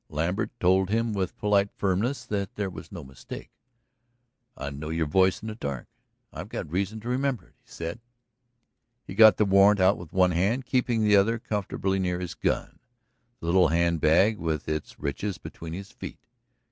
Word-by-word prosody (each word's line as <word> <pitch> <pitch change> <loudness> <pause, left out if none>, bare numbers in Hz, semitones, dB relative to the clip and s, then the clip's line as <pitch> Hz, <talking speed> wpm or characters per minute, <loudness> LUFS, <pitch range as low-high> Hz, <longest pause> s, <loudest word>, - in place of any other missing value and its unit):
Lambert 90 +8 -1
told 95 +1 +3
him 115 +1 0
with 95 -3 -2
polite 100 -1 +2
firmness 100 +8 -1
that 100 -2 -3
there 100 -2 -2
was 85 - -10
no 85 -5 -7
mistake. 65 -1 -10 1.1
"I'd 70 0 -6
know 75 +1 -5
your 80 0 0
voice 95 +5 +2
in - - -5
the 110 - -4
dark 70 - -5 0.5
I've - - -7
got - - -5
reason 100 +5 -1
to 115 - -9
remember 130 0 -1
it," - - -32
he - - -30
said. 85 +6 -6 1.1
He - - -8
got 110 -1 +7
the 105 - +3
warrant 100 +1 +5
out 95 +2 +4
with 85 -3 -10
one 90 -1 +3
hand, 100 +10 0
keeping 120 -3 +1
the 105 -1 +5
other 105 +4 +3
comfortably 100 -3 -2
near 90 -1 -1
his 90 -2 -5
gun, - - -2 0.6
the - - -6
little 90 +2 +4
hand 85 0 +1
bag 95 +8 +4
with 80 -3 -2
its 75 -1 -4
riches 90 +7 -3
between 80 0 -9
his 95 +5 -7
feet. 125 - -10
95 Hz, 185 wpm, -27 LUFS, 85-105 Hz, 1.1 s, got